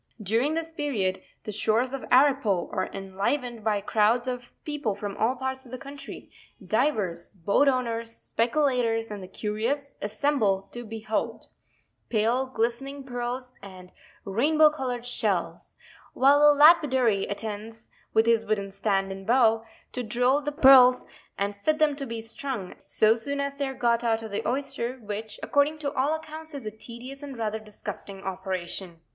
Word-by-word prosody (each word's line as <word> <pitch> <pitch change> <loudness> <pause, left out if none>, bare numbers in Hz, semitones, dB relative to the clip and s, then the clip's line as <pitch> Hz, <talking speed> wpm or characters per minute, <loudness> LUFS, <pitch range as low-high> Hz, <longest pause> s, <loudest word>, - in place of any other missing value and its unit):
"During 235 - +1
this 325 0 -3
period, 260 -12 -1 0.2
the 215 - -5
shores 220 +5 +1
of 275 - -4
Arippo 255 -9 +3
are 185 - -2
enlivened 205 +5 -3
by 210 -2 +1
crowds 220 +4 +2
of 245 -1 -4
people 295 -9 -2
from 200 0 -5
all 230 +4 +1
parts 265 0 -4
of 245 - -15
the 255 - -5
country; 280 +3 -10 0.3
divers, 190 - 0
boat 200 - +1
owners, 230 -3 0
speculators, 230 -2 0
and 205 -1 -6
the 185 - -8
curious, 230 +9 -2
assemble 210 -3 0
to 240 - -7
behold 220 -1 -4 0.3
*' - - -37
Pale 235 +4 +1
glistening 270 +5 -2
pearls, 250 0 -4
and 185 -2 -12 0.3
rainbow 300 +10 +4
colour'd 250 -5 -4
shells,' 245 - -2 0.4
while 280 +2 +5
the 295 -1 +6
lapidary 260 - +5
attends 220 +2 -6 0.2
with 220 0 +3
his 230 -1 +3
wooden 200 -2 -2
stand 195 -1 0
and 195 0 -8
bow, 225 -2 +4 0.3
to 250 - -3
drill 245 +5 +2
the 295 +1 -2
pearls 260 -3 +7 0.3
and 200 +1 -1
fit 305 +10 0
them 305 -2 +3
to 275 -2 -4
be 230 -1 -4
strung, 225 -3 -5
so 220 +1 +3
soon 280 +5 -4
as 280 0 -3
they 280 - 0
are 265 - -5
got 235 -1 +1
out 225 -1 +1
of 220 - -7
the 200 - -1
oyster, 260 -2 -2
which, 215 -1 -6
according 290 +2 +2
to 285 -2 -3
all 285 +4 +1
accounts, 315 0 -8
is 270 -5 -6
a 215 - -3
tedious 240 +5 -10
and 280 -3 -8
rather 220 -1 -2
disgusting 205 -2 -8
operation. 185 -2 -5
235 Hz, 165 wpm, -27 LUFS, 210-275 Hz, 0.4 s, pearls